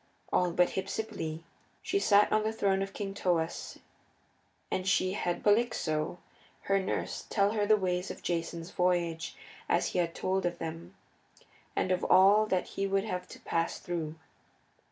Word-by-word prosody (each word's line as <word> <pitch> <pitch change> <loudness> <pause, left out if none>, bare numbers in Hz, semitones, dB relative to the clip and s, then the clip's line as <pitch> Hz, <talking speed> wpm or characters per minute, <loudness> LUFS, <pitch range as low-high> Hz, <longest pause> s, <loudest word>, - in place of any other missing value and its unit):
All 180 - +3
but 175 +1 +3
Hypsipyle. 190 -5 -4 0.4
She 395 - +1
sat 205 - +5
on 215 - +3
the 215 +1 0
throne 195 -3 +1
of 195 0 -3
King 195 -1 -4
Thoas 170 -4 -1 0.9
and 185 0 -1
she 185 -1 +2
had 175 -3 -2
Polyxo, 205 -8 +1 0.4
her 195 0 +2
nurse, 190 - -3
tell 200 -1 +2
her 215 -1 -1
of 205 - +1
the 215 0 +6
ways 180 -1 -1
of - - -8
Jason's 170 0 -3
voyage 175 -3 0 0.3
as - - +2
he - - -1
had 170 -1 0
told 190 -1 0
of 175 0 -4
them, 165 +3 -7 0.8
and 185 - 0
of 180 - +1
all 200 +3 +6
that 185 -3 0
he 195 - -2
would 195 0 +1
have 180 -4 -4
to - - -11
pass 165 0 -1
through. 165 -3 -4
185 Hz, 165 wpm, -30 LUFS, 170-200 Hz, 0.9 s, the